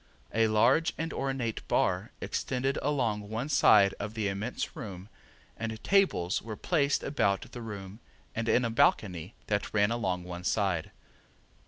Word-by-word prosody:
A 115 0 +3
large 120 +10 +3
and 165 0 -3
ornate 130 -5 -2
bar - - +1
extended 135 +1 -1
along 115 -8 -1
one 115 +6 -3
side 100 -8 +6
of 105 +2 -5
the 110 -2 0
immense 105 +5 -4
room 95 -1 -8 0.5
and 110 -1 -5
tables 190 - +2
were 110 -1 -7
placed 145 -5 +1
about 100 -9 0
the 120 - -7
room 100 -2 -7 0.3
and 115 0 -2
in 125 - +3
a 115 - -1
balcony 90 -6 +1
that 105 +1 -2
ran 105 +1 +3
along 95 -7 -1
one 90 0 -7
side. 95 -4 0
110 Hz, 150 wpm, -30 LUFS, 100-125 Hz, 0.5 s, side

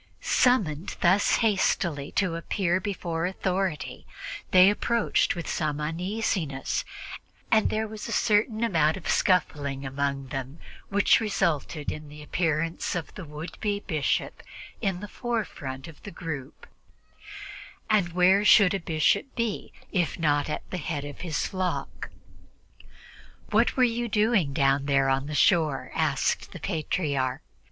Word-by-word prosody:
Summoned 190 - +2
thus 185 +3 +4
hastily 170 -8 +1
to 185 -5 +1
appear 175 +1 0
before 175 -4 -2
authority, 185 -8 -2 0.4
they 185 0 +7
approached 235 0 +1
with 170 - -5
some 150 -2 -1
uneasiness, 165 -2 -2 0.7
and 220 - +4
there 220 0 -1
was 215 0 -7
a - - -5
certain 220 +1 +2
amount 160 -7 +2
of 185 - -8
scuffling 140 -7 +1
among 135 0 -2
them 135 +2 -5 0.3
which 205 +1 +4
resulted 165 -8 -1
in 150 -1 -8
the 150 0 -11
appearance 165 +1 -1
of 170 -3 -4
the 190 - -8
would 150 +3 -8
be 205 -1 -1
bishop 155 -8 -1 0.4
in 190 -4 -1
the 205 - -6
forefront 190 - -4
of 160 -3 -13
the - - -8
group 155 -7 -7 1.2
and 195 -6 +2
where 185 +3 +4
should 205 -2 +6
a 195 - 0
bishop 165 - +1
be 230 -3 -2 0.2
if 175 -4 0
not 145 -3 +1
at 150 - -4
the 185 - -2
head 150 -2 -3
of 145 -1 -8
his 165 -3 -1
flock? 185 -1 -3 1.4
"What - - +3
were 255 - +5
you 240 0 +1
doing 210 -7 +2
down 135 -1 +2
there 135 -1 +3
on 135 +1 0
the 150 - -4
shore?" 155 -3 +2
asked - - 0
the - - -8
Patriarch. 145 -4 -1
170 Hz, 140 wpm, -27 LUFS, 145-200 Hz, 1.4 s, they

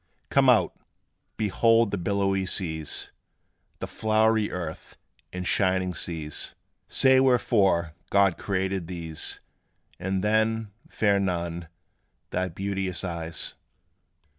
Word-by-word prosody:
Come - - +5
out! - - +4 0.6
behold 115 +1 +3
the 100 - -1
billowy 95 0 0
seas, 80 -6 -1 0.7
The - - -4
flowery 110 0 +1
earth, 85 -3 -6 0.3
and 90 0 -5
shining 95 -1 +1
skies: 80 -4 -3 0.3
Say 130 0 +5
wherefore 105 -10 +3 0.2
God 100 -3 +4
created 95 -2 -2
these; 80 -3 -3 0.6
And 95 +1 -2
then, 110 0 +1 0.2
fair 100 -2 +2
Nun, 85 -3 -2 0.6
thy 95 0 0
beauteous 95 +1 -3
eyes. 85 -2 -3
95 Hz, 100 wpm, -26 LUFS, 85-105 Hz, 0.7 s, Come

